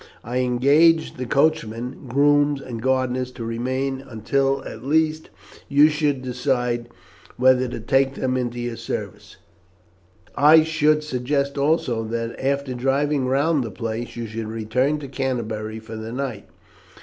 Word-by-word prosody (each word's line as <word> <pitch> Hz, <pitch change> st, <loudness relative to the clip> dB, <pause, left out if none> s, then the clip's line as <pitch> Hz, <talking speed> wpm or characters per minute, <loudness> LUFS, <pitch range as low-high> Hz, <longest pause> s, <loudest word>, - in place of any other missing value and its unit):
I 125 Hz, +2 st, -2 dB
engaged 140 Hz, +7 st, +3 dB
the 125 Hz, -1 st, -4 dB
coachman, 125 Hz, -3 st, 0 dB
grooms, 145 Hz, +2 st, +3 dB
and 120 Hz, -4 st, -7 dB
gardeners 130 Hz, 0 st, 0 dB
to 115 Hz, -, -6 dB
remain 130 Hz, +3 st, -2 dB
until, 135 Hz, +4 st, 0 dB
at 110 Hz, -, -8 dB
least, 155 Hz, +2 st, +1 dB, 0.4 s
you 145 Hz, +2 st, +6 dB
should 150 Hz, -4 st, 0 dB
decide 125 Hz, -2 st, -1 dB, 0.5 s
whether 130 Hz, 0 st, +4 dB
to 120 Hz, -, -5 dB
take 135 Hz, +4 st, +1 dB
them 130 Hz, -1 st, -1 dB
into 120 Hz, -1 st, -2 dB
your 120 Hz, -1 st, -4 dB
service. -, -, -6 dB, 1.0 s
I 155 Hz, +2 st, +7 dB
should 155 Hz, -1 st, +2 dB
suggest 140 Hz, +1 st, -1 dB
also 140 Hz, -5 st, +1 dB
that, 115 Hz, +1 st, -3 dB
after 140 Hz, -1 st, 0 dB
driving 135 Hz, +2 st, 0 dB
round 140 Hz, +2 st, +2 dB
the 115 Hz, -, -5 dB
place, 115 Hz, +3 st, -5 dB
you 120 Hz, -1 st, -4 dB
should 110 Hz, 0 st, -5 dB
return 115 Hz, +6 st, 0 dB
to 140 Hz, -, -6 dB
Canterbury 110 Hz, -5 st, -3 dB
for 110 Hz, 0 st, -9 dB
the 110 Hz, +1 st, -6 dB
night. 125 Hz, -5 st, -4 dB
130 Hz, 140 wpm, -22 LUFS, 120-140 Hz, 1.0 s, I